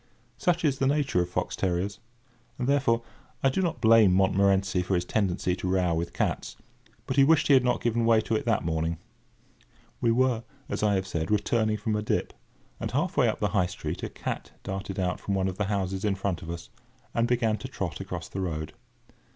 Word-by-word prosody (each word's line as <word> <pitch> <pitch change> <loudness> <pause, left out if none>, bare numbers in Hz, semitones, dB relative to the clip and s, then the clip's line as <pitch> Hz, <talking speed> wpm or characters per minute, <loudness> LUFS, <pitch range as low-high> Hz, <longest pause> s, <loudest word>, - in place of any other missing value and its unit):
Such 175 +2 +1
is 135 -3 +1
the 135 - +2
nature 140 -10 +2
of 90 - -2
fox - - -2
terriers; 95 +2 -1 0.6
and, 125 - -2
therefore, 130 -5 +2 0.4
I 135 - +5
do 190 - 0
not 170 -8 -1
blame 110 -5 +6
Montmorency 95 0 +3
for 90 +1 0
his 90 0 0
tendency 90 -3 0
to 90 - -4
row 90 -2 +2
with 85 +1 -2
cats; - - -2 0.5
but 130 - -3
he 140 - +7
wished 155 +2 +4
he - - +7
had 130 -2 +6
not 125 0 0
given 120 0 +1
way 115 -1 +5
to 110 - -1
it 110 - 0
that 115 -7 +1
morning. 80 0 -1 1.0
We 115 - +3
were, 120 -1 +2 0.3
as - - -2
I 105 -1 +3
have 95 0 0
said, 85 -2 -3
returning 110 +1 +1
from 110 0 -1
a 105 - 0
dip, 105 - -1 0.5
and - - -3
half 150 +8 -1
way 135 -5 +4
up 110 - -1
the 105 - +1
High 90 -2 +2
Street 90 - -5
a - - -3
cat - - -5
darted 95 0 -5
out 90 -3 -1
from 100 - -2
one 95 0 +1
of 95 +1 -5
the 105 - +1
houses 95 -1 -2
in 105 -2 +1
front 95 -3 -2
of 80 - -8
us, 85 0 -6 0.4
and 115 0 +2
began 115 -3 +1
to - - -6
trot - - -4
across - - -5
the 95 - -5
road. 80 -3 -3
100 Hz, 215 wpm, -27 LUFS, 90-120 Hz, 1.0 s, he